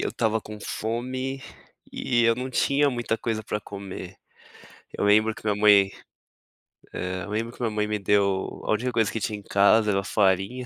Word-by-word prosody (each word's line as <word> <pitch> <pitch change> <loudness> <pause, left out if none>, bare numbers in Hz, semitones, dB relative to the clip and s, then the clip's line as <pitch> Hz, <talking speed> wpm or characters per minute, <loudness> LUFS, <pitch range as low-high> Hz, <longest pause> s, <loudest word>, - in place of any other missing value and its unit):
eu - - -1
estava 110 -1 0
com 105 0 -10
fome, 130 +5 -4 0.5
e 120 -1 +1
eu 115 0 +4
não 130 +1 -4
tinha 140 +2 +2
muita 120 -3 -2
coisa 110 -2 -2
para 105 0 -3
comer. 95 -2 -8 0.8
Eu - - -2
lembro 110 +2 +4
que 110 - -5
a - - +3
minha 105 +1 -4
mãe 100 -2 +6 1.1
eh, 90 0 -3
eu 105 - -8
lembro 115 +3 -3
que - - -13
minha 115 - +1
mãe 105 0 -1
me 105 0 -2
deu, 100 -1 0
a - - -1
última 120 +4 0
coisa 115 -3 +1
que 115 - -3
tinha 105 0 -3
em 105 - -12
casa 105 +2 +4
era 100 0 0
farinha, 100 +6 +1
110 Hz, 195 wpm, -25 LUFS, 100-115 Hz, 1.1 s, mãe